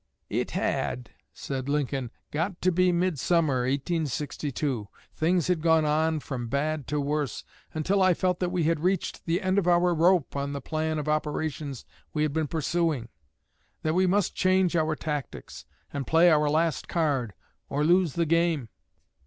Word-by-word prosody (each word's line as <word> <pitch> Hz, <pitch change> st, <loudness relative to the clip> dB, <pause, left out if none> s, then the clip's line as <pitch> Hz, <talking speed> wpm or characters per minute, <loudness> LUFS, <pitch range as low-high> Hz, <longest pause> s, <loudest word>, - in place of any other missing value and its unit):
"It -, -, -1 dB
had," 125 Hz, 0 st, -2 dB, 0.2 s
said 135 Hz, -1 st, -5 dB
Lincoln, 140 Hz, -3 st, -1 dB, 0.2 s
"got 170 Hz, +4 st, -2 dB
to 185 Hz, -, +4 dB
be 180 Hz, +1 st, +3 dB
midsummer, 165 Hz, -6 st, +1 dB
1862. 140 Hz, -, -2 dB, 0.3 s
Things 170 Hz, 0 st, +1 dB
had 180 Hz, -3 st, +1 dB
gone 160 Hz, -1 st, +4 dB
on 155 Hz, +1 st, +1 dB
from 125 Hz, -4 st, -5 dB
bad 145 Hz, +2 st, -1 dB
to 150 Hz, -, -1 dB
worse, 145 Hz, -2 st, -2 dB, 0.3 s
until 190 Hz, +6 st, +1 dB
I 185 Hz, -2 st, +5 dB
felt 180 Hz, 0 st, 0 dB
that 180 Hz, -, 0 dB
we 180 Hz, -2 st, 0 dB
had 165 Hz, 0 st, +1 dB
reached 185 Hz, +2 st, -1 dB
the 170 Hz, +3 st, 0 dB
end 185 Hz, +1 st, +2 dB
of 180 Hz, -, -2 dB
our 175 Hz, 0 st, +4 dB
rope 170 Hz, -2 st, +3 dB
on 140 Hz, 0 st, -2 dB
the 140 Hz, -, -3 dB
plan 155 Hz, +3 st, -2 dB
of 150 Hz, 0 st, -3 dB
operations 150 Hz, -3 st, -2 dB, 0.3 s
we 150 Hz, -, +2 dB
had 150 Hz, -2 st, 0 dB
been 160 Hz, -1 st, 0 dB
pursuing; 155 Hz, -5 st, -1 dB, 0.7 s
that 155 Hz, -, +1 dB
we 185 Hz, +2 st, +3 dB
must 195 Hz, 0 st, +1 dB
change 185 Hz, -1 st, +2 dB
our 155 Hz, -1 st, +1 dB
tactics 150 Hz, -4 st, -5 dB, 0.3 s
and 140 Hz, -2 st, -3 dB
play 170 Hz, +2 st, +5 dB
our 150 Hz, -1 st, +3 dB
last 160 Hz, +1 st, 0 dB
card, 140 Hz, -, 0 dB, 0.3 s
or 145 Hz, +2 st, 0 dB
lose 175 Hz, -1 st, +3 dB
the 170 Hz, -, +1 dB
game. 165 Hz, -6 st, +1 dB
155 Hz, 165 wpm, -27 LUFS, 145-175 Hz, 0.7 s, I